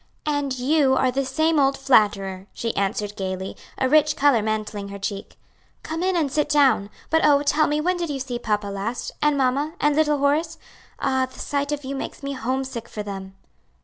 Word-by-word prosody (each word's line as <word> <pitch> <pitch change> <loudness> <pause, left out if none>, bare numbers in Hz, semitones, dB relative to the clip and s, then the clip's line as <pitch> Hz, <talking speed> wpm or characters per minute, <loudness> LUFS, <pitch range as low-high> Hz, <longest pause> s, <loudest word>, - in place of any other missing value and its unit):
"And 290 -3 -1
you 270 +1 +3
are 260 -1 +2
the 275 +2 0
same 315 +4 +1
old 275 0 +3
flatterer," 200 -7 +2
she 230 -1 -3
answered 205 +1 -1
gayly, 190 0 -4 0.2
a 260 - +1
rich 300 +1 +4
color 285 -7 +4
mantling 215 -1 -3
her 200 0 -7
cheek. 200 0 -5 0.5
"Come 320 +1 -4
in 375 0 +1
and 305 -5 +1
sit 300 +1 0
down. 275 -9 +3 0.2
But 320 0 +3
oh, 290 -1 +5
tell 300 +1 +3
me 300 0 0
when 360 +3 +1
did 340 -2 -3
you 280 -2 -3
see 250 -2 -4
papa 210 -3 -1
last? 200 +5 -4
and 295 -1 +3
mamma, 275 +4 +1
and 295 0 +2
little 300 -1 +3
Horace? 290 +4 +1 0.4
Ah! 260 -1 +1
the - - -15
sight 285 0 -2
of 290 -1 -3
you 270 - -4
makes 275 - -6
me 280 0 -3
homesick 260 -1 -3
for 210 - -5
them." 195 -1 -7
270 Hz, 200 wpm, -23 LUFS, 215-295 Hz, 0.5 s, oh